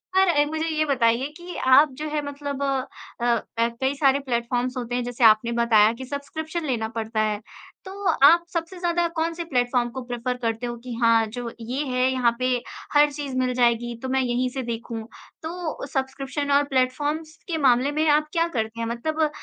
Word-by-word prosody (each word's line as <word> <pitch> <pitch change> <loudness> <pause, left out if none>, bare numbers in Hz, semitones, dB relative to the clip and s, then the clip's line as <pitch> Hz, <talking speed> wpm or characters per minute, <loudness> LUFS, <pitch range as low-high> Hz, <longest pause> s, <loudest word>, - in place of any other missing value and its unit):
पर 380 0 +5
अ, 295 -4 +3
मुझे 315 +2 -2
ये 310 -1 0
बताइए 255 -2 +2
कि 350 0 -9
आप 265 +4 +6
जो 310 - -2
है 300 0 -1
मतलब 285 -1 -4
अ, 260 -3 -2 0.2
ऐ 230 0 +3
कई 265 +2 +1
सारे 275 -1 +3
प्लेटफ़ॉर्म्स 245 -1 -2
होते 245 -1 -3
हैं 245 - 0
जैसे 245 0 -3
आपने 220 +1 +5
बताया 220 -2 +5
कि 260 +3 -8
सब्सक्रिप्शन 315 +5 -5
लेना 235 -6 -1
पड़ता 220 -1 -1
है, 215 -1 0 0.5
तो 390 +1 -8 0.2
आप 340 +3 +7
सबसे 335 +2 -3
ज़्यादा 345 -1 +1
कौन-से 330 +1 -1
प्लेटफ़ॉर्म 245 -4 +1
को 260 +2 -6
प्रिफ़र 245 +1 -3
करते 230 -1 -2
हो 240 - -4
कि 250 -1 -6
हाँ, 230 -1 +5
जो 235 +2 -6
ये 250 +5 -3
है 255 -1 +1
यहाँ 245 -3 +2
पे 255 - +1 0.5
हर 295 0 +5
चीज़ 285 -2 -5
मिल 255 -1 +1
जाएगी 240 -1 +1
तो 260 - -3
मैं 265 0 +2
यहीं 250 0 0
से 265 +1 -4
देखूँ? 230 -1 -5 0.4
तो 330 -2 -4
सब्सक्रिप्शन 275 +2 -2
और 285 +1 +5
प्लेटफ़ॉर्म्स 290 +5 0
के 335 -3 -1
मामले 265 -1 +3
में 310 +2 +1
आप 300 +1 +3
क्या 335 -1 +2
करते 220 +1 -2
हैं 230 - -2
मतलब 310 +7 -1
260 Hz, 195 wpm, -24 LUFS, 240-300 Hz, 0.5 s, आप